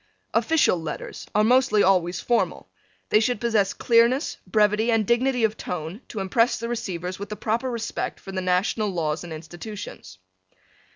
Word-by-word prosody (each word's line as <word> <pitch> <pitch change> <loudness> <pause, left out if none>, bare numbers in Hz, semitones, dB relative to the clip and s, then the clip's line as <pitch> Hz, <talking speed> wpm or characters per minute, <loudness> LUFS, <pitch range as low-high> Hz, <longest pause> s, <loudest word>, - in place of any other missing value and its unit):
Official 315 - +3
letters 155 -2 -6
are 210 - +4
mostly 245 -2 +4
always 180 -2 +2
formal. 240 -1 -1 0.4
They 215 - +5
should 225 0 0
possess 220 -4 +2
clearness, 235 +4 +2
brevity 210 +3 +2
and 225 -2 +2
dignity 245 +2 +2
of 220 0 +1
tone 180 - -5
to 210 - -5
impress 230 +5 +2
the 230 - -4
receivers 185 -6 -4
with 200 - -6
the 210 - -4
proper 230 +5 -1
respect 235 -2 -4
for 195 - -9
the 190 -1 -2
national 185 +4 +1
laws 160 -4 -2
and 175 - -9
institutions. 160 - -8
210 Hz, 160 wpm, -24 LUFS, 180-235 Hz, 0.4 s, They